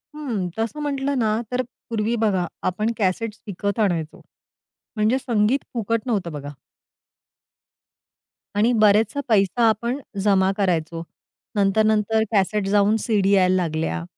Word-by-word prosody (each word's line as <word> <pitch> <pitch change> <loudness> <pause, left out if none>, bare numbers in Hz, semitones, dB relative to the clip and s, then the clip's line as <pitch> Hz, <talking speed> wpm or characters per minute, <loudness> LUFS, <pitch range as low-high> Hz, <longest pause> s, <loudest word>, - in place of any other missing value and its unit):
हं. 235 -12 -3
तसं 225 +7 -2
म्हटलं 280 -1 -1
ना 220 -2 +1
तर 250 0 +1 0.3
पूर्वी 225 0 0
बघा 190 -5 +1 0.2
आपण 215 +5 -1
कॅसेट्स 210 +2 -1
विकत 200 +1 -3
आणायचो. 170 -7 -1 0.7
म्हणजे 215 +4 +2
संगीत 235 0 +1
फुकट 230 -1 -1
नव्हतं 200 -8 -1
बघा. 145 -1 -6 2.1
आणि 215 +4 +3
बरेचसा 215 +5 +3
पैसा 215 +2 +3
आपण 235 +5 -1 0.2
जमा 195 -2 +3
करायचो. 165 -4 -1 0.5
नंतर, 200 +1 +3
नंतर 220 0 +2
कॅसेट 205 0 +1
जाऊन 205 +1 +3
सीडी 200 -4 +2
यायला 185 -2 +4
लागल्या 155 - -1
210 Hz, 125 wpm, -22 LUFS, 190-225 Hz, 2.1 s, यायला